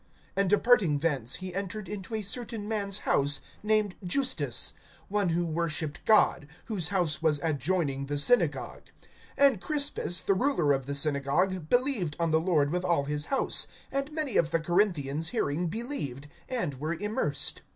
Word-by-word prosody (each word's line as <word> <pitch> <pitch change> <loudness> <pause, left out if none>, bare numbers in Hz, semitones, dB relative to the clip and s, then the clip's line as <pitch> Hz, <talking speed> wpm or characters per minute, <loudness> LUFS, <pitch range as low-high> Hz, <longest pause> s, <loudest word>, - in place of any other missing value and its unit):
(7)And 200 0 +3
departing 210 -6 +3
thence 140 -6 -1
he 185 -1 -5
entered 195 +2 -4
into 210 +1 -6
a 215 - -3
certain 220 +1 -5
man's 205 -2 0
house, 140 0 +2 0.2
named 215 -2 +3
Justus, 260 +9 +1 0.4
one 200 -2 +1
who 170 +1 0
worshiped 160 -2 -2
God, 215 -8 +3 0.2
whose 195 -8 -1
house 170 -5 0
was 155 -3 +2
adjoining 145 -2 -1
the 145 0 -2
synagogue. 150 - +1 0.5
(8)And 275 -8 +4
Crispus, 285 - +2
the 195 - +1
ruler 185 - +1
of 135 -1 -3
the 140 - -3
synagogue, 150 +5 0
believed 245 - +1
on 165 -1 0
the 160 0 +3
Lord 155 -5 +1
with 180 +1 -1
all 170 -6 +1
his 150 +1 -1
house; 270 - +2 0.2
and 275 +2 -2
many 305 -5 -1
of 160 - +2
the 165 0 +1
Corinthians 165 -4 0
hearing 175 -7 -1
believed, 165 - -4 0.2
and 180 - -3
were 155 +4 -2
immersed. 155 -7 -1
175 Hz, 160 wpm, -28 LUFS, 150-210 Hz, 0.5 s, 8)And